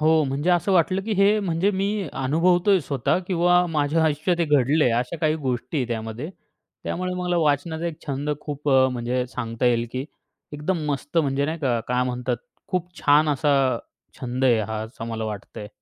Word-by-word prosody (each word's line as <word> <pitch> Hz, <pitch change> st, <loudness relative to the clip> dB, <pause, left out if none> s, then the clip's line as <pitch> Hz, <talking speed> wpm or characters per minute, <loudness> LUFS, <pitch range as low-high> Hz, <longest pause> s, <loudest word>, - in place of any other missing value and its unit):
हो, 155 Hz, 0 st, +4 dB
म्हणजे 140 Hz, +6 st, 0 dB
असं 180 Hz, +2 st, +2 dB
वाटलं, 185 Hz, +2 st, +2 dB
की 220 Hz, +1 st, -3 dB
हे 200 Hz, +2 st, +4 dB
म्हणजे 185 Hz, +1 st, +1 dB
मी 200 Hz, +1 st, -1 dB, 0.2 s
अनुभवतोय 175 Hz, +6 st, +3 dB
स्वतः 140 Hz, +3 st, 0 dB
किंवा 175 Hz, 0 st, +3 dB
माझ्या 155 Hz, 0 st, +1 dB
आयुष्यात 155 Hz, +3 st, +1 dB
हे -, -, +3 dB
घडले 145 Hz, +1 st, +3 dB
आहे. 120 Hz, -, +3 dB
अशा 125 Hz, +7 st, -5 dB
काही 155 Hz, -1 st, +2 dB
गोष्टी 130 Hz, +4 st, -2 dB
आहे 125 Hz, -, 0 dB
त्यामध्ये. 115 Hz, +7 st, -4 dB, 0.5 s
त्यामुळे 180 Hz, +1 st, -2 dB
मला 180 Hz, -1 st, -1 dB
वाचनाचा 160 Hz, +2 st, 0 dB
एक 165 Hz, -1 st, -6 dB
छंद 140 Hz, +1 st, -2 dB
खूप, 145 Hz, 0 st, -5 dB
म्हणजे 125 Hz, -2 st, +2 dB
सांगता 120 Hz, -1 st, -3 dB
येईल 120 Hz, -1 st, +2 dB
की, 130 Hz, +1 st, -3 dB, 0.5 s
एकदम 150 Hz, +5 st, -2 dB
मस्त, 145 Hz, +4 st, -2 dB
म्हणजे 140 Hz, -2 st, +1 dB
नाही 160 Hz, +1 st, -3 dB
का, 125 Hz, -5 st, 0 dB
काय 125 Hz, 0 st, +1 dB
म्हणतात, 125 Hz, -1 st, -2 dB, 0.3 s
खूप 180 Hz, -2 st, -1 dB
छान 150 Hz, +2 st, +4 dB
असा 145 Hz, 0 st, +2 dB, 0.7 s
छंद 125 Hz, +1 st, -2 dB
आहे 120 Hz, -4 st, +4 dB
हा, 110 Hz, +1 st, -3 dB
असं 115 Hz, +1 st, -8 dB
मला 115 Hz, -1 st, -3 dB
वाटतंय. 105 Hz, 0 st, -7 dB
150 Hz, 180 wpm, -24 LUFS, 125-170 Hz, 0.7 s, हो